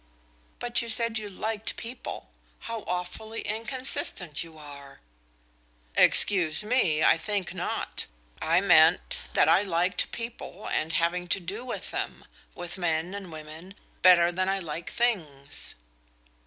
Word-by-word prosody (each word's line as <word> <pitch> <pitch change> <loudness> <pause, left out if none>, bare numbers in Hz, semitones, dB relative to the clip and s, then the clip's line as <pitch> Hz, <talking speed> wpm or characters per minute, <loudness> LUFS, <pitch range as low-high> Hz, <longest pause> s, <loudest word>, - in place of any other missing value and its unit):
"But 240 0 +1
you 235 - -5
said 225 0 +1
you 210 -1 -6
liked 215 +2 -2
people. 240 +2 -7 0.3
How 230 0 -4
awfully 180 +5 -4
inconsistent 225 - -1
you 165 -1 -13
are!" 140 -2 -12 1.0
"Excuse 175 -3 +5
me, 190 -10 +2
I - - +6
think 200 -1 -2
not. 180 -1 -3 0.3
I - - +3
meant - - +5 0.2
that - - +5
I - - +6
liked 180 -2 0
people 230 -4 -6
and 160 +2 -1
having 175 +2 +1
to 175 - +1
do 195 +6 -5
with 255 - -5
them - - -4 0.3
with 175 +1 -6
men 170 +1 -1
and 195 -4 -7
women 160 +5 -10 0.3
better 175 -1 +7
than 185 +2 -1
I 195 - +1
like 165 -2 -5
things." 155 - -2
185 Hz, 135 wpm, -27 LUFS, 165-220 Hz, 1.0 s, better